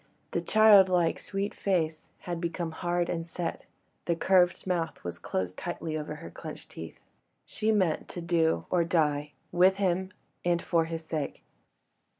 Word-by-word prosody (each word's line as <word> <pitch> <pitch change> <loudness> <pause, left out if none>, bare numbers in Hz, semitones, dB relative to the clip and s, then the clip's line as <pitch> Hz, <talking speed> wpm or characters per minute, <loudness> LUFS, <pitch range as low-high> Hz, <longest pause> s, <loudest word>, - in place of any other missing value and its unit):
The - - 0
childlike 190 -6 +5
sweet 200 0 -3
face 165 -5 -1
had 175 -2 -4
become 170 -1 -2
hard 175 +1 -1
and 165 -1 -3
set, 170 0 -4 0.4
the 170 - +1
curved 180 +1 +3
mouth 175 -3 -2
was 85 - -5
closed 90 -1 -3
tightly 170 -2 -4
over 150 0 -4
her 85 - -9
clenched - - -9
teeth. 80 - -9 0.5
She 220 0 0
meant 185 -7 +1
to - - -6
do 165 - +1
or 175 -2 +3
die, 150 -3 +1 0.2
with 185 +2 +5
him 190 -1 0 0.3
and 175 -1 +2
for 165 -1 +1
his 165 0 -5
sake. 155 -3 -4
170 Hz, 150 wpm, -29 LUFS, 160-185 Hz, 0.5 s, childlike